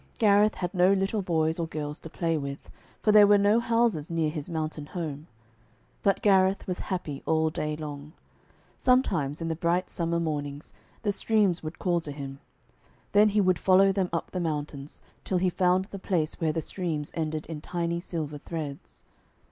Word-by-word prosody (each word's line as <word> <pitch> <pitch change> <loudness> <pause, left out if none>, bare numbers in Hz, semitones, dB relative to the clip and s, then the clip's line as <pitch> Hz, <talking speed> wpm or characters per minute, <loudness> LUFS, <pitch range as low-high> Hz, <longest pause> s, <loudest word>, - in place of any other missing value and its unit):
Gareth 210 0 +4
had 180 0 -3
no 180 0 +4
little 195 +2 0
boys 160 -2 0
or 165 - -1
girls 150 -1 -5
to 165 - -9
play 165 0 -1
with, 140 -2 -5 0.3
for 215 - +4
there 210 -1 +8
were 205 0 +6
no 205 +3 +4
houses 230 -9 +1
near 165 -2 0
his 150 -1 -6
mountain 155 -2 -3
home. 155 -3 -5 0.7
But 195 - +1
Gareth 190 -1 +4
was 180 -1 -3
happy 170 -7 -4
all 160 0 +2
day 150 0 -2
long. 150 -1 -7 0.7
Sometimes 175 - +2
in - - -2
the 165 - -1
bright 175 +3 0
summer 170 0 -1
mornings 145 -3 -4 0.3
the 205 - +2
streams 200 -4 +1
would 155 +1 -6
call 175 -2 +1
to 155 -3 -7
him. 140 -1 -7 0.7
Then 210 +1 +6
he 210 0 +2
would 185 -3 +2
follow 195 +1 +5
them 190 -2 0
up 165 - -3
the 185 - -3
mountains, 150 -3 -4 0.2
till 185 - 0
he 180 0 +1
found 185 +1 +2
the 200 0 -9
place 170 -5 -1
where 160 -1 +2
the 160 +1 -2
streams 160 -5 -3
ended 155 -1 -2
in 160 -2 -7
tiny 170 0 -2
silver 155 -4 -5
threads. 150 -3 -7
170 Hz, 180 wpm, -27 LUFS, 155-190 Hz, 0.7 s, there